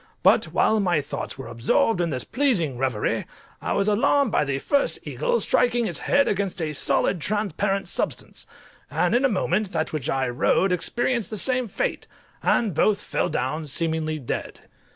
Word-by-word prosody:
But - - +5
while 220 - +2
my 180 -5 +2
thoughts 145 0 -5
were 135 - -7
absorbed 120 - +1
in 170 - 0
this 130 -4 -2
pleasing 225 - +1
reverie 130 -5 -1 0.3
I - - -1
was 200 - +1
alarmed 265 +4 +3
by - - +2
the 140 -2 -1
first 280 - +1
eagle - - -1
striking 240 -1 +2
its - - -3
head 280 0 +2
against 195 -2 -1
a 155 -2 -2
solid 175 +4 +1
transparent 200 +1 -1
substance, - - -3 0.4
and - - +1
in 245 +3 +3
a 275 - +4
moment 200 -1 0
that 160 -1 -1
which 155 -1 -2
I 135 0 0
rode 130 +9 +2
experienced 235 +6 0
the 215 - -4
same 255 +3 +1
fate, - - -3 0.3
and 220 -6 +2
both 205 +6 +2
fell - - -1
down 150 +5 -2
seemingly 160 +1 -1
dead. 130 -6 -5
190 Hz, 175 wpm, -24 LUFS, 150-225 Hz, 0.4 s, But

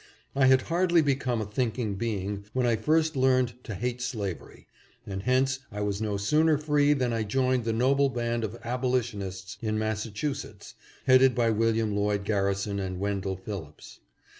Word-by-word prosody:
I 135 -1 +4
had 130 0 +5
hardly 175 -1 +2
become 130 -5 0
a - - -2
thinking 110 0 -2
being 100 -1 -3
when 130 -1 +1
I 120 -1 +3
first 155 +7 +1
learned 130 -2 +2
to 110 - -5
hate 125 +4 -3
slavery, 105 -8 -5 0.4
and 95 -1 -5
hence 130 +4 +1
I 105 0 -5
was 105 0 -1
no 105 -2 -1
sooner 150 +9 +3
free 150 -1 +3
than 125 -4 0
I 115 - 0
joined 130 +3 +1
the 115 - +1
noble 135 +4 +3
band 120 -2 -2
of 110 +2 -4
Abolitionists 115 -7 -2
in 110 -1 -1
Massachusetts, 110 +5 -4 0.3
headed 130 0 +6
by 115 -2 +2
William 110 -1 +1
Lloyd 100 -1 0
Garrison 100 -1 0
and 95 -1 -4
Wendell 100 -1 -2
Phillips. 95 -6 -8
115 Hz, 165 wpm, -27 LUFS, 100-130 Hz, 0.4 s, headed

